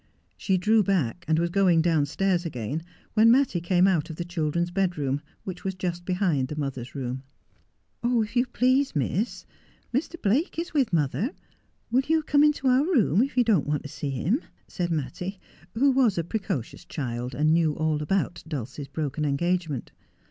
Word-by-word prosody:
She 190 Hz, -2 st, 0 dB
drew 215 Hz, +4 st, +4 dB
back, 180 Hz, -, 0 dB
and 160 Hz, 0 st, +3 dB
was 170 Hz, +1 st, 0 dB
going 185 Hz, -3 st, +4 dB
downstairs 170 Hz, +3 st, +1 dB
again, 140 Hz, -1 st, -3 dB, 0.3 s
when 220 Hz, +1 st, +6 dB
Mattie 245 Hz, -8 st, +3 dB
came 180 Hz, +1 st, +3 dB
out 175 Hz, -4 st, +2 dB
of 160 Hz, -, -6 dB
the 175 Hz, -, -4 dB
children's 170 Hz, 0 st, -1 dB
bedroom, 155 Hz, -8 st, 0 dB, 0.2 s
which 185 Hz, -2 st, -7 dB
was 190 Hz, -1 st, -2 dB
just 175 Hz, -1 st, -3 dB
behind 180 Hz, -8 st, +1 dB
the 150 Hz, -, -6 dB
mother's 135 Hz, -4 st, -4 dB
room. 130 Hz, -1 st, -3 dB, 0.8 s
'Oh, 240 Hz, -1 st, +2 dB
if 215 Hz, +2 st, -8 dB
you 245 Hz, +1 st, +3 dB
please, 260 Hz, -2 st, +2 dB
Miss, 175 Hz, -, -1 dB, 0.5 s
Mr. 330 Hz, +6 st, -2 dB
Blake 255 Hz, -, +1 dB
is 335 Hz, 0 st, -3 dB
with 275 Hz, -8 st, +2 dB
mother. 170 Hz, -, 0 dB, 0.6 s
"Will 255 Hz, +3 st, +4 dB
you 320 Hz, 0 st, +2 dB
come 295 Hz, -1 st, +4 dB
into 300 Hz, -2 st, +2 dB
our 255 Hz, +2 st, +5 dB
room, 235 Hz, -, +3 dB
if 270 Hz, 0 st, -1 dB
you 245 Hz, -, +6 dB
don't 210 Hz, -12 st, +2 dB
want 150 Hz, 0 st, -1 dB
to 145 Hz, -, -7 dB
see 145 Hz, -, -4 dB
him? 170 Hz, -, 0 dB
' -, -, -38 dB
said 175 Hz, -1 st, -3 dB
Mattie, 170 Hz, +5 st, -3 dB, 0.4 s
who 275 Hz, +4 st, +4 dB
was 255 Hz, -7 st, +3 dB
a 170 Hz, -, +1 dB
precocious 185 Hz, -, -4 dB
child, 125 Hz, -3 st, -4 dB
and 155 Hz, +3 st, +3 dB
knew 165 Hz, -2 st, +3 dB
all 155 Hz, -1 st, 0 dB
about 175 Hz, +2 st, -1 dB
Dulcie's 140 Hz, -1 st, -5 dB
broken 150 Hz, +1 st, -3 dB
engagement. 155 Hz, -1 st, -1 dB
175 Hz, 180 wpm, -26 LUFS, 150-220 Hz, 0.8 s, when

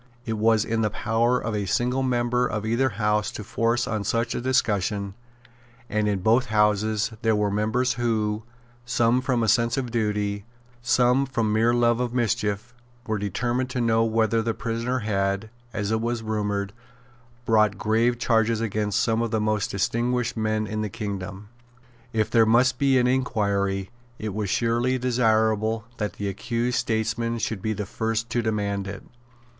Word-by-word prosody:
It 115 Hz, -, -2 dB
was 110 Hz, 0 st, +2 dB
in 115 Hz, 0 st, 0 dB
the 105 Hz, -, +2 dB
power 115 Hz, +4 st, +1 dB
of 110 Hz, -, -3 dB
a 100 Hz, -2 st, -2 dB
single 125 Hz, +6 st, +1 dB
member 125 Hz, -1 st, +1 dB
of 105 Hz, 0 st, -3 dB
either 120 Hz, +4 st, +2 dB
House 105 Hz, -1 st, 0 dB
to 105 Hz, -, -6 dB
force 115 Hz, +3 st, 0 dB
on 110 Hz, -3 st, -2 dB
such 115 Hz, +3 st, 0 dB
a -, -, -3 dB
discussion; 105 Hz, -5 st, 0 dB, 0.8 s
and 105 Hz, 0 st, +1 dB
in 100 Hz, -3 st, 0 dB
both 115 Hz, +5 st, +3 dB
Houses 105 Hz, 0 st, +2 dB
there 110 Hz, -2 st, +2 dB
were 105 Hz, -1 st, +1 dB
members 110 Hz, +5 st, +1 dB
who, 110 Hz, -3 st, -1 dB, 0.4 s
some 120 Hz, +1 st, +2 dB
from 125 Hz, -3 st, 0 dB
a -, -, +1 dB
sense 115 Hz, +4 st, +2 dB
of 125 Hz, -3 st, -2 dB
duty, 105 Hz, -3 st, -1 dB, 0.4 s
some 125 Hz, +2 st, +3 dB
from 115 Hz, -5 st, 0 dB
mere 115 Hz, +2 st, +3 dB
love 120 Hz, -1 st, +2 dB
of 125 Hz, -1 st, -2 dB
mischief, 115 Hz, -1 st, -1 dB, 0.3 s
were 110 Hz, -3 st, -1 dB
determined 120 Hz, +6 st, -1 dB
to 125 Hz, -, -3 dB
know 115 Hz, -1 st, +3 dB
whether 115 Hz, 0 st, +2 dB
the 115 Hz, 0 st, -2 dB
prisoner 115 Hz, +2 st, -2 dB
had, 100 Hz, +1 st, -1 dB, 0.2 s
as 105 Hz, -2 st, -2 dB
it 110 Hz, 0 st, +1 dB
was 115 Hz, 0 st, -2 dB
rumoured, 105 Hz, -2 st, -2 dB, 0.7 s
brought 110 Hz, -3 st, +3 dB
grave 115 Hz, +4 st, +1 dB
charges 115 Hz, -1 st, +2 dB
against 105 Hz, -2 st, 0 dB
some 115 Hz, 0 st, +1 dB
of 115 Hz, -, -1 dB
the 110 Hz, 0 st, 0 dB
most 105 Hz, -1 st, 0 dB
distinguished 120 Hz, +4 st, 0 dB
men 110 Hz, -1 st, 0 dB
in 110 Hz, +1 st, -3 dB
the 105 Hz, -, -2 dB
kingdom. 100 Hz, -2 st, -6 dB, 0.6 s
If 110 Hz, -3 st, 0 dB
there 115 Hz, -2 st, +5 dB
must 125 Hz, +4 st, +3 dB
be 135 Hz, -2 st, +4 dB
an 125 Hz, -, +3 dB
inquiry, 100 Hz, -6 st, 0 dB, 0.3 s
it 110 Hz, -2 st, -4 dB
was 105 Hz, -1 st, -2 dB
surely 120 Hz, +4 st, +1 dB
desirable 110 Hz, -3 st, +1 dB
that 105 Hz, -3 st, -2 dB
the 100 Hz, -, -4 dB
accused 120 Hz, +5 st, -1 dB
statesmen 115 Hz, +1 st, -1 dB
should 110 Hz, -3 st, -3 dB
be 110 Hz, +2 st, -1 dB
the 105 Hz, 0 st, -4 dB
first 115 Hz, +3 st, -2 dB
to 120 Hz, -, +1 dB
demand 100 Hz, -3 st, -1 dB
it. 100 Hz, -1 st, -7 dB
110 Hz, 170 wpm, -25 LUFS, 105-120 Hz, 0.8 s, there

